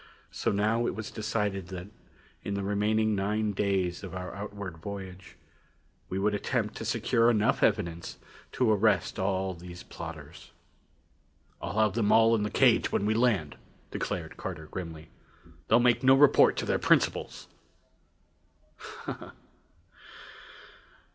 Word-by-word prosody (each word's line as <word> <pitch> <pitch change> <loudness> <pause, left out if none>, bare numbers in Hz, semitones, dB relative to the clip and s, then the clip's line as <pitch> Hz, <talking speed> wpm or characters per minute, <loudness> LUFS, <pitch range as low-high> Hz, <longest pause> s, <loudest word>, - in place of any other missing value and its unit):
So - - -1
now 110 +4 +1
it - - -2
was 110 -1 -6
decided 105 -4 -2
that 95 0 -7 0.5
in 100 - -3
the 100 - -2
remaining 105 +2 +1
nine 105 +2 0
days 95 -3 -1
of 90 -2 -7
our 90 0 -6
outward 100 -3 -7
voyage, 95 -1 -8 0.7
we 95 - -3
would 105 +2 +1
attempt 105 - -1
to - - -6
secure 115 0 +2
enough 110 -2 +2
evidence 85 0 0 0.4
to 125 -4 +2
arrest 105 -4 +2
all 95 0 0
these 90 +1 -10
plotters. 85 +1 -9 1.1
"I'll - - -4
have 110 -2 +3
them 110 -3 +1
all 115 0 +6
in 110 - +2
the 105 - -1
cage - - +3
when 100 - 0
we 110 - +2
land," 110 - +1 0.3
declared - - -4
Carter 80 - -6
grimly. 80 -1 -8 0.6
"They'll 115 - +5
make 120 0 +3
no 135 0 +6
report 145 +1 +5
to - - -1
their - - 0
principals!" - - +1
100 Hz, 135 wpm, -29 LUFS, 90-110 Hz, 1.1 s, all